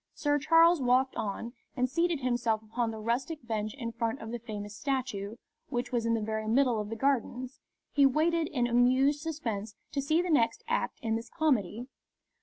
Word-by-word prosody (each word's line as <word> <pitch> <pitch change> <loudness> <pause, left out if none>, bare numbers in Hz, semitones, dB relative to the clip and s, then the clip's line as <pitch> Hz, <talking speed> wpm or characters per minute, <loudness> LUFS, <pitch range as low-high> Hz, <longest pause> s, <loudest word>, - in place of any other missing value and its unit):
Sir 290 -1 +1
Charles 330 +2 +5
walked 255 +1 +3
on, 220 +3 -4 0.2
and, 250 0 +2
seating 335 +5 +1
himself 240 -4 0
upon 225 +2 -2
the 220 - -5
rustic 240 +6 -2
bench 215 0 -2
in 235 -4 -4
front 230 +2 -2
of 225 0 -7
the 240 - -4
famous 210 -3 -7
statue, 245 -5 -2 0.3
which 245 0 -2
was 235 -2 0
in 230 - +3
the 225 - -1
very 220 0 -2
middle 240 0 +3
of 210 - -6
the 225 - -4
Gardens, 260 +1 -1 0.3
he 280 -2 +5
waited 320 +4 +2
in 245 -5 0
amused 255 +4 +3
suspense 225 -10 -4 0.2
to 280 - -1
see 310 +4 +2
the 355 0 0
next 230 -6 +2
act 475 +1 -1
in 225 -1 +1
this 230 - -8
comedy. 245 - 0
245 Hz, 190 wpm, -30 LUFS, 225-280 Hz, 0.3 s, Charles